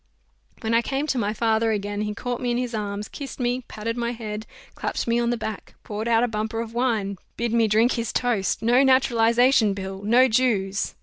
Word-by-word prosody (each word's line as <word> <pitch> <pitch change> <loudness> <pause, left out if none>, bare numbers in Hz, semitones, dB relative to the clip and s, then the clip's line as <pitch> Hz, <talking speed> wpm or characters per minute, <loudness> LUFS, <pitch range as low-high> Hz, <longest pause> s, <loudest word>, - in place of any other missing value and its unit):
When 225 +1 -1
I 230 - +4
came 270 +4 -2
to 270 -4 0
my 205 -2 0
father 225 0 +1
again, 205 0 -2
he 210 0 -3
caught 245 +3 -4
me 245 - -1
in 240 - +1
his 245 -1 -2
arms, 205 -1 -3
kissed 280 -1 -8
me, 245 0 -1
patted 230 +2 -4
my 235 0 -1
head, 215 -2 -6 0.3
clapped - - -3
me 235 +1 +2
on 235 0 +1
the 240 - 0
back, 220 -2 -6
poured 215 +2 -4
out 230 0 +3
a - - +2
bumper 220 0 -3
of 230 0 -5
wine, 220 -6 -1 0.2
bid 235 -1 -1
me 230 -1 +3
drink 220 +4 +3
his 230 -2 -2
toast, 225 -7 0
"No 240 +3 +4
Naturalization 245 -4 +4
Bill! 190 0 -6
No 240 +5 +5
Jews!" 215 -5 0
230 Hz, 210 wpm, -24 LUFS, 210-245 Hz, 0.3 s, No